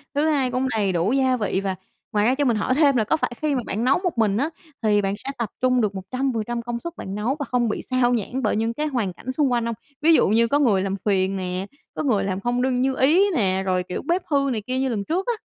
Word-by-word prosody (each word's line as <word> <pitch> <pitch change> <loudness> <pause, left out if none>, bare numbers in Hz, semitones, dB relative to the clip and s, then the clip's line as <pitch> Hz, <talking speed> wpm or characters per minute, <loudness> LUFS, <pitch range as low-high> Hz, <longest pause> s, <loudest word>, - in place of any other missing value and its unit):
thứ 290 +2 +2
hai 270 -5 +1
cũng 255 +1 0
đầy 210 -5 0
đủ 180 +5 +1
gia 260 -1 +2
vị. 200 -3 -1
Và 195 -1 -2 0.4
ngoài 210 0 +2
ra, 250 +3 +3
cho 290 +1 0
mình 235 -4 +2
hỏi 210 - 0
thêm 285 -2 +4
là 230 - +3
có 265 +9 +1
phải - - -1
khi 300 -2 +1
mà 250 - 0
bạn 215 +4 -2
nấu 255 +2 +4
một 355 -8 -1
mình, 210 -2 +2
ớ, 285 +6 0 0.3
thì 210 -1 +3
bạn 195 0 -1
sẽ 265 - -7
tập 230 -4 -2
trung 255 -1 +3
được 205 -2 -1
100% 235 +3 -2
công 235 0 -4
suất 340 +6 -6
bạn 190 - -6
nấu 220 +6 -1
và 285 - -2
không 240 -2 0
bị - - -2
sao 255 -1 +2
nhãng 245 +3 -2
bởi 215 - +1
những 225 +2 0
cái 300 +5 -2
hoàn 230 -10 -1
cảnh 255 +8 -6
xung 275 0 +1
quanh 240 -1 +1
hông? 235 -1 -2 0.3
Ví 325 +2 +5
dụ - - +5
như 230 +3 +3
có 285 +5 +2
người 220 -9 +3
làm 195 0 -1
phiền 195 -2 +1
nè, 185 0 -3 0.3
có - - -2
người 220 -9 +2
làm 190 -1 -2
không 240 +4 -1
đương 255 -1 +1
như 265 0 +1
ý 315 +10 +4
nè, 190 -6 +1
rồi, 185 -1 +1
kiểu, 180 - -5
bếp 350 +2 +2
hư 280 -3 +1
này 220 -4 -2
kia 255 0 -1
như 265 0 0
lần 215 -4 -2
trước 350 - -2
á? 480 - +2
240 Hz, 285 wpm, -23 LUFS, 205-265 Hz, 0.4 s, Ví